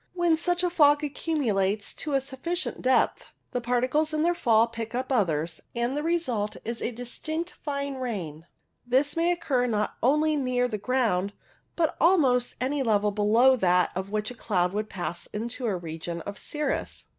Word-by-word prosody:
When 345 -2 +3
such 350 +2 0
a 355 - +1
fog 295 -2 +5
accumulates 220 -10 0
to 300 - -4
a 270 - +3
sufficient 285 +7 -4
depth, 255 0 +1 0.2
the 245 - -2
particles 255 +6 +1
in 305 - +1
their 345 +1 +3
fall 230 -8 +4
pick 230 0 -6
up 260 +2 -2
others, 165 - 0
and 240 +3 0
the 295 - -1
result 295 -11 -1
is 230 +1 -4
a - - 0
distinct 310 +8 -5
fine 280 -1 -2
rain. 175 - -5 0.4
This 265 +4 +1
may 335 +1 +2
occur 285 -8 0
not 210 -3 -1
only 300 +4 +3
near 255 -3 +1
the 215 -4 -4
ground, 205 -5 0 0.4
but 325 -3 +2
at - - -12
almost 270 -9 +3
any 270 +3 0
level 210 -4 +2
below 220 +6 +4
that 180 -4 +3
at 190 +1 -3
which 215 +1 -1
the - - -7
cloud 185 -6 0
would 215 +1 -2
pass 175 -2 -5
into 235 +4 -4
the 210 -4 +1
region 170 0 -5
of 200 +3 -7
cirrus. 300 -2 -3
245 Hz, 180 wpm, -27 LUFS, 210-295 Hz, 0.4 s, fog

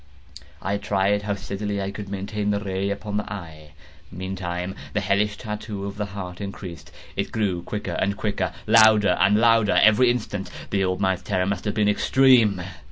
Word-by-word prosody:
I 100 +1 0
tried 100 0 +1
how 105 -1 -2
steadily 100 +1 -4
I 100 0 -3
could 100 -1 -7
maintain 100 +1 -3
the 100 0 +1
ray 100 -1 -2
upon 105 +1 -3
the 105 - -4
eve. 80 -6 -8 0.4
Meantime 90 0 -4 0.2
the 105 - +1
hellish 100 +1 +1
tattoo 105 -2 -5
of 100 0 -6
the 105 -1 -2
heart 90 -1 -7
increased. 95 -3 -8 0.2
It - - -2
grew 100 -6 -1
quicker 105 +4 -5
and 100 +1 0
quicker, 105 -2 -1
and - - -2
louder 110 -2 +6
and 100 +2 +4
louder 115 -2 +4
every 110 +4 +6
instant. 105 -5 -2 0.2
The 100 -1 +1
old 95 0 -1
man's 95 -1 +1
terror 95 -1 0
must 100 0 -2
have 105 - -1
been 105 -1 +2
extreme! 110 -3 +4
100 Hz, 180 wpm, -24 LUFS, 95-105 Hz, 0.4 s, louder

